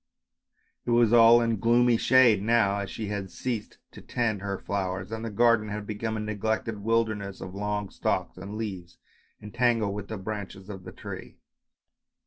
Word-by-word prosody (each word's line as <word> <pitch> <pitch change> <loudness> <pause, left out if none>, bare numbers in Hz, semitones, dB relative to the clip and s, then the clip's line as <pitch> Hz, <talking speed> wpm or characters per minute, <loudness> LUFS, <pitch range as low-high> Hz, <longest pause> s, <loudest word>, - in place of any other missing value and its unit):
It - - -6
was 120 -1 +4
all 120 0 +8
in 115 -3 0
gloomy 120 +2 +4
shade 120 -4 +5
now, 105 -2 +2
as 100 -1 -4
she 110 -2 -5
had 100 -2 -4
ceased 115 -1 -4
to - - -12
tend 110 -5 -1
her 100 -1 -3
flowers 95 0 -3
and 110 0 -4
the 115 - -3
garden 115 0 +3
had 105 0 -5
become 110 +1 -3
a - - -3
neglected 105 +1 -2
wilder 115 +1 +1
ness 100 -2 -7
of 95 - -8
long 105 0 -3
stalks - - -1
and 100 +3 -7
leaves 95 -6 -6 0.5
entangled 115 -1 +1
with 105 0 -6
the 110 - -5
branches 100 -1 -6
of 95 -2 -9
the - - -8
tree. - - -9
105 Hz, 175 wpm, -27 LUFS, 100-115 Hz, 0.5 s, all